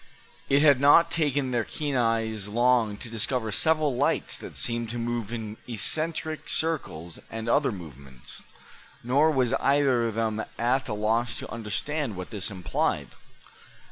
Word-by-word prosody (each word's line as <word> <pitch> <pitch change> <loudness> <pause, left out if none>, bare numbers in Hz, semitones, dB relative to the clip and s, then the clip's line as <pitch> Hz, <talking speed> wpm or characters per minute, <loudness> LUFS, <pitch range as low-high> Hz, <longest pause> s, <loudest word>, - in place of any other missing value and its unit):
It 140 +2 +4
had 140 -4 +6
not 165 +4 +6
taken 145 -5 0
their 120 -2 +1
keen 145 +1 -3
eyes 115 -3 0
long 120 -1 +2
to 120 - -4
discover 115 0 0
several 155 +3 +2
lights 135 +4 0
that - - -9
seemed 120 -1 -2
to 120 - -4
move 120 -2 -3
in 110 -2 -5
eccentric 155 +6 -1
circles 120 - -3
and 115 0 -6
other 140 +3 +2
movements. 70 - -11 0.6
Nor 140 +6 +3
was 130 -4 +1
either 135 -4 +3
of 110 - -4
them 110 -1 -1
at 130 +3 0
a 105 - -2
loss 115 +3 0
to - - -7
understand 115 +4 -3
what 95 +4 -7
this 105 -3 -2
implied. 95 -2 -2
120 Hz, 150 wpm, -26 LUFS, 110-140 Hz, 0.6 s, had